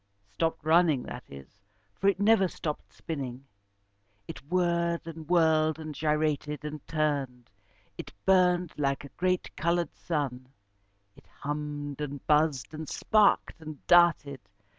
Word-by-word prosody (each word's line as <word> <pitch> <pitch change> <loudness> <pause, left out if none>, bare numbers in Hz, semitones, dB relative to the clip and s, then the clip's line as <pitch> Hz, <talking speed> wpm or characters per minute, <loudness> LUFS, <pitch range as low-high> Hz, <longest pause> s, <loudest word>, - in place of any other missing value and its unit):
Stopped 160 +6 -2
running, 160 -5 +4
that - - -8
is, 70 +9 -13 0.3
for 195 - -1
it 200 -1 +3
never 205 -2 +4
stopped 155 -3 -6
spinning. 135 -4 -6 0.8
It 135 - -8
whirred, 170 -2 0
and 165 -1 -9
whirled, 160 -2 +3
and 155 -1 -7
gyrated, 150 0 -1
and 150 -1 -6
turned. 140 -6 -2 0.5
It - - -7
burned 180 -2 +3
like 140 -1 0
a - - -10
great 185 +3 -1
coloured 170 +1 0
sun. 135 -6 -3 0.7
It - - -20
hummed, 145 -1 -5
and 145 -2 -5
buzzed, 150 -3 +2
and 155 -1 -6
sparked, 210 -5 +2
and 155 -3 -10
darted. 165 -6 +4
155 Hz, 130 wpm, -28 LUFS, 145-170 Hz, 0.8 s, running